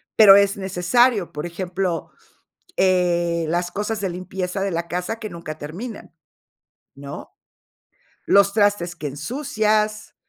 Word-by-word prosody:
pero 205 -3 +9
es 200 0 +3
necesario. 190 +3 +2
Por 150 +3 -4
ejemplo, 180 0 -3 0.7
eh, 175 -2 +2
las 175 +1 -1
cosas 210 +1 -3
de 195 - -1
limpieza 185 +1 -4
de 195 - -1
la 170 0 -3
casa 180 +7 -3
que 215 - -6
nunca 160 -2 -7
terminan, 195 +10 -8 0.8
¿no? 140 +1 -9 0.9
Los 200 0 +5
trastes 205 -5 +1
que 155 - -9
ensucias, 215 - -1
185 Hz, 120 wpm, -22 LUFS, 170-210 Hz, 0.9 s, pero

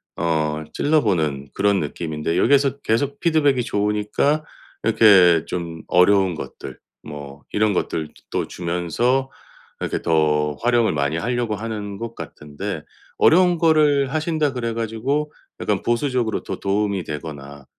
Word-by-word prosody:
어 80 -2 -1
찔러 155 +1 +2
보는 75 - -1
그런 100 -1 +2
느낌인데. 80 +1 -3
여기에서 140 0 +3
계속 140 +5 -1
피드백이 145 -6 +2
좋으니까 105 +9 0 0.4
이렇게 95 -7 +5
좀 85 -2 -5
어려운 95 +1 +4
것들 80 - -8 0.2
뭐 70 -1 -9
이런 105 -1 +2
것들 80 -3 -2
뜨 - - -25 0.2
또 - - -1
주면서 90 +10 -1 0.5
이렇게 - - -3
더 75 -2 +1
활용을 120 -5 +3
많이 70 +1 0
하려고 120 +1 -1
하는 105 -2 -5
것 115 0 -6
같은데 75 -1 -6 0.4
어려운 175 0 +5
거를 150 -4 +3
하신다 155 -2 0
그래 115 -3 -3
가지고 115 +7 -2 0.3
약간 - - -1
보수적으로 120 -1 0
더 - - -5
도움이 100 -1 -1
되거나 70 -3 -8
105 Hz, 300 characters per minute, -21 LUFS, 80-130 Hz, 0.5 s, 이렇게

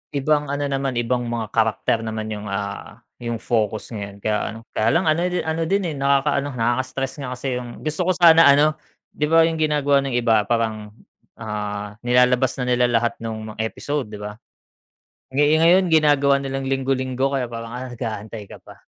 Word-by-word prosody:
ibang 150 +1 +1
ano 145 +1 -2
naman, 135 -2 -2
ibang 120 +1 -1
mga 115 -2 -4
character 110 0 +1
naman 110 -1 -4
yung, 105 -1 -5
ah, 100 0 -5 0.2
yung 120 -1 -3
focus 110 -2 -1
ngayon. 100 -2 -7
Kaya 105 -1 +1 0.2
ano, - - -9
kaya 110 - 0
lang 170 +2 +2
ano 155 - 0
di 180 0 -1
ano 160 +1 -2
din, 195 +3 +1
eh, - - -6
nakaka 140 +1 +2
nakaka-stress 130 0 -2
nga 135 -3 -5
kasi 125 0 -3
yung 120 -1 -9
gusto 155 +3 -2
ko 185 - +4
sana 165 -2 +7
ano, 145 +2 +5 0.4
'di 150 - 0
ba 165 0 +6
yung 165 - -2
ginagawa 145 -2 +2
ng 135 -3 -2
iba 115 -3 +3
parang, 110 -3 -2 0.4
ah, 105 -1 -5
nilalabas 125 +1 +3
na - - 0
nila 125 0 +3
lahat 120 0 0
nung 110 -1 -5
mga 110 - -14
episode, 145 +2 -4
'di 105 -1 -9
ba? 105 +1 -7 0.9
Eh, 145 +3 +3
ngayon 180 +3 +5
ginagawa 145 -3 +4
nilang 135 0 -4
linggo-linggo 135 0 -1
kaya 130 - 0
parang, 115 0 -6
ah, 125 +1 -5
nag-aantay 110 -2 -6
ka - - -10
pa. - - -15
125 Hz, 185 wpm, -22 LUFS, 110-145 Hz, 0.9 s, sana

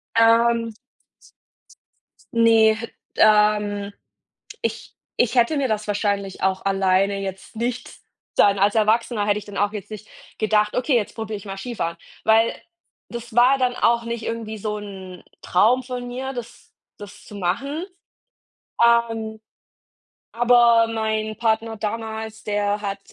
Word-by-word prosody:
Ähm 230 0 +4 1.6
Ne, 225 -1 +5 0.4
ähm, 210 -1 +3 0.7
ich - - -4 0.3
ich 245 +1 +2
hätte 245 +5 +3
mir 275 -2 +1
das 215 -1 -2
wahrscheinlich 200 -2 -2
auch 190 0 0
alleine 195 0 +2
jetzt 195 +2 -7
nicht 240 +2 -4 0.4
dann 200 -1 +4
als 200 +1 +3
Erwachsener 220 0 +2
hätte 205 0 +2
ich 210 - -13
dann 205 -1 -8
auch 205 +1 +1
jetzt 210 0 -7
nicht 215 0 -8 0.3
gedacht: 215 -1 +1
„Okay, 255 +2 +1
jetzt 220 -4 0
probiere 220 -2 -4
ich 200 - -12
mal 195 -1 -6
Skifahren“, 195 -7 -4 0.3
weil 225 +1 +3 0.5
das 235 -1 -8
war 250 +3 +5
dann 250 -1 +1
auch 235 0 +2
nicht 235 -1 -4
irgendwie 225 -1 -4
so 210 0 -3
'n 190 -3 -9 0.2
Traum 240 +8 +3
von 250 -1 -6
mir, 260 +2 -5
das 240 -1 -10 0.2
das 205 -1 -12
zu 210 - -11
machen. 275 - -2 1.0
Ähm, 225 -2 +2 0.9
aber 235 -1 +5
mein 220 -1 -2
Partner 225 -1 0
damals, 220 0 -5
der 205 0 -1
hat, 200 -1 -3
220 Hz, 135 wpm, -22 LUFS, 205-235 Hz, 1.6 s, Ne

